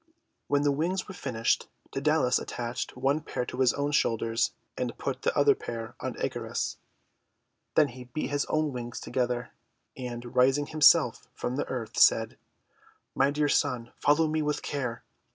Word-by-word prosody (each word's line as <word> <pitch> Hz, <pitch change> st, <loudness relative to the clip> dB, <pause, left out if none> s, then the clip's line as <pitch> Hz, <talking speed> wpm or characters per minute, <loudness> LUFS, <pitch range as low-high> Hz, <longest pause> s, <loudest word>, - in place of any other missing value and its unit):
When 145 Hz, 0 st, +2 dB
the 145 Hz, -, +3 dB
wings 175 Hz, +7 st, -1 dB
were -, -, -7 dB
finished, 125 Hz, -9 st, 0 dB, 0.2 s
Dsedalus 145 Hz, -2 st, +2 dB
at -, -, -8 dB
tached 120 Hz, +1 st, -4 dB
one 135 Hz, +4 st, +1 dB
pair 125 Hz, -4 st, -3 dB
to 125 Hz, -, -7 dB
his 130 Hz, -2 st, +5 dB
own 145 Hz, +1 st, -1 dB
shoulders, 115 Hz, -3 st, +1 dB, 0.2 s
and -, -, -3 dB
put -, -, -3 dB
the -, -, 0 dB
other -, -, +6 dB
pair 115 Hz, -1 st, -6 dB
on -, -, -4 dB
Icarus. -, -, -2 dB, 1.0 s
Then 150 Hz, -2 st, +5 dB
he 125 Hz, 0 st, -10 dB
beat 125 Hz, +4 st, -4 dB
his 145 Hz, 0 st, 0 dB
own 155 Hz, -2 st, 0 dB
wings 120 Hz, -1 st, -5 dB
together, 125 Hz, -1 st, -2 dB, 0.4 s
and, 120 Hz, -2 st, -6 dB
raising 135 Hz, +3 st, +4 dB
himself 155 Hz, 0 st, +4 dB
from 125 Hz, -, -3 dB
the 145 Hz, -, -2 dB
earth, 120 Hz, -3 st, -4 dB
said: 115 Hz, 0 st, +4 dB, 0.7 s
'My 135 Hz, -, +3 dB
dear 145 Hz, +1 st, +1 dB
son, 120 Hz, -4 st, 0 dB
follow 150 Hz, +2 st, +4 dB
me 155 Hz, 0 st, 0 dB
with 150 Hz, -1 st, -1 dB
care. 125 Hz, -5 st, -3 dB
130 Hz, 165 wpm, -28 LUFS, 120-145 Hz, 1.0 s, other